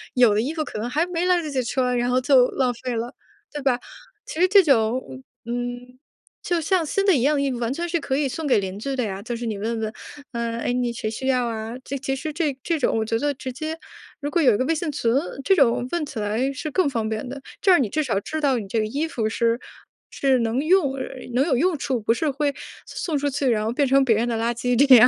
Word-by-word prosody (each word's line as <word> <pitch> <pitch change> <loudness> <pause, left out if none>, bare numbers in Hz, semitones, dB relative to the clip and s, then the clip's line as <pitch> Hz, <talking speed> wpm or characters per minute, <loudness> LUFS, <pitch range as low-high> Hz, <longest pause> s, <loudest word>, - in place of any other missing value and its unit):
有 245 -4 +6
的 210 - +2
衣 275 +7 -2
服 320 -1 -1
可 - - -7
能 230 +3 -3
还 305 +6 +1
没 355 -1 -1
来 360 -1 +3
得 310 - -5
及 260 -2 0
穿， 250 0 0
然 245 0 +1
后 250 +1 +3
就 255 -2 +5
浪 255 -2 +1
费 250 +1 -5
了 230 +2 -3 0.4
对 295 - -5
吧？ 260 -3 +2 0.5
其 315 - -6
实 365 - +6
这 395 +1 +7
种， 225 - +1 0.2
嗯， 245 +1 -5 0.4
就 350 -1 0
像 360 +2 +2
新 395 +6 0
的 390 -4 +5
一 255 - +1
样 295 +3 +3
的 280 - +1
衣 275 - 0
服 245 - -4
完 235 0 -1
全 340 +4 -3
是 340 0 0
可 270 -2 -1
以 290 -1 +1
送 315 +4 -4
给 265 - +4
邻 190 0 -4
居 275 +4 -3
的 255 - 0
呀， 195 -3 -4
就 235 +3 -4
是 235 +1 -5
你 220 -2 -2
问 225 +2 -2
问， 215 0 -3 0.4
呃， 235 -1 -2
哎， 245 - 0
你 245 -1 0
谁 230 - -4
需 260 +4 -4
要 255 -2 +2
啊？ 225 0 -4
这 275 - -5
其 270 0 -2
实 305 +3 -5
这 295 -4 -1
这 330 -2 0
种 250 - +1
我 220 - 0
觉 225 +1 0
得 290 +3 +1
直 255 0 -6
接， 310 +4 -4 0.4
如 290 0 -3
果 345 - +2
有 250 -8 +5
一 - - 0
个 255 - 0
微 325 - +2
信 320 0 -2
群， 240 -5 0 0.3
这 385 - +4
种 250 -5 +3
问 345 -2 0
起 285 -6 -6
来 220 +6 0
是 300 +3 -5
更 345 0 +2
方 230 -5 -1
便 220 +3 -3
的， 275 +2 -6 0.2
这 - - +2
样 350 -6 +6
你 - - -1
至 310 - 0
少 230 -8 0
知 310 +9 -4
道 275 -4 +3
你 210 -4 -5
这 225 +4 0
个 215 - +1
衣 285 +8 -1
服 225 -8 -1
是 230 +1 +1 0.5
是 270 -2 +2
能 230 +2 0
用 330 -5 +3
呃 260 - -3 0.3
能 265 +3 +3
有 295 -5 +2
用 335 +6 +2
处， 260 -4 -1
不 215 - +1
是 305 +6 0
会 285 +1 0 0.3
送 325 - -3
出 285 +1 0
去， 275 0 -1
然 215 -3 +1
后 220 - -1
变 275 +3 +1
成 270 +1 +5
别 235 -4 +3
人 230 +3 +1
的 235 - -1
垃 230 +1 +1
圾， 245 +1 0
这 265 - +10
样。 245 +1 +9
255 Hz, 295 characters per minute, -23 LUFS, 235-295 Hz, 0.5 s, 这